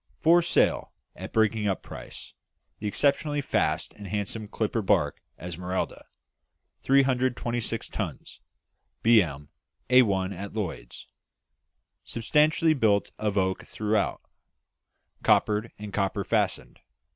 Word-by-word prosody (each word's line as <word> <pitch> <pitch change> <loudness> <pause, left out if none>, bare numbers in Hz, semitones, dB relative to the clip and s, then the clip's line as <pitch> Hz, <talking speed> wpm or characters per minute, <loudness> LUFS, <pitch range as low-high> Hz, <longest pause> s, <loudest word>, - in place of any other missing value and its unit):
"For 170 +2 +5
Sale, 170 - +1 0.2
at - - -8
Breaking 110 -1 +2
up 95 - -1
Price. - - -10 0.5
The 105 - -3
exceptionally 145 +6 +1
fast 140 - 0
and 100 -1 -10
handsome 105 +2 -3
clipper 110 +2 -1
barque 95 -8 +1 0.2
Esmeralda, 90 +2 -4 0.8
326 130 -3 +1
tons - - -6 0.6
B.M., 85 -11 +3 0.4
A1 100 -7 +4
at 100 +3 -7
Lloyd's. 90 - -5 1.0
Substantially 155 +7 +2
built 110 -7 +2
of 105 -1 -1
oak 95 -1 0
throughout; 105 -1 -1 1.0
coppered, 105 +2 +2
and 105 -1 -8
copper 100 -2 0
fastened. - - -1
105 Hz, 100 wpm, -27 LUFS, 95-125 Hz, 1.0 s, For